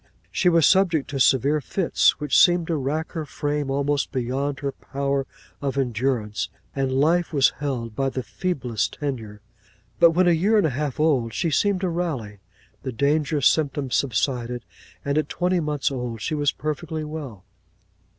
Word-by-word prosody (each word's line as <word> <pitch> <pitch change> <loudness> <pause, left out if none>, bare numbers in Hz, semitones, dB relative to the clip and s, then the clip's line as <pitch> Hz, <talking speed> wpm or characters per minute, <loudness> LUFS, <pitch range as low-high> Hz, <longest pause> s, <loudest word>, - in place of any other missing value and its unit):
She 180 - +3
was 165 -3 +4
subject 170 -9 +3
to 140 - -3
severe 135 +4 +3
fits, 175 +6 +2
which 150 -3 -1
seemed 175 -2 +5
to 165 - -1
rack 150 +3 -2
her 160 -3 -3
frame 145 -1 -3
almost 140 +1 0
beyond 135 +3 -2
her 140 -1 -1
power 140 0 -2 0.3
of 140 -1 -2
endurance: 120 -4 -1 0.3
and 135 -1 0
life 160 +6 +2
was 140 -4 +4
held 125 -6 -3
by 135 -1 0
the 130 -1 -4
feeblest 130 - -2
tenure: 115 -8 -4 0.6
but 170 - +8
when 175 +2 +3
a - - +6
year 195 +7 +3
and 205 - +3
a 155 - +1
half 140 +1 -3
old, 130 -8 +1
she 170 -2 0
seemed 200 +4 +2
to 185 - 0
rally; 145 - -3 0.4
the 130 - -4
dangerous 145 +2 +1
symptoms 140 -4 +2
subsided; 125 -1 -1 0.4
and 140 +2 +1
at 155 - -3
twenty 180 0 0
months 150 -3 -1
old, 125 -3 -4
she 155 - -3
was 145 -2 +1
perfectly 155 +1 -4
well. 145 -11 -7
145 Hz, 170 wpm, -24 LUFS, 130-160 Hz, 0.6 s, but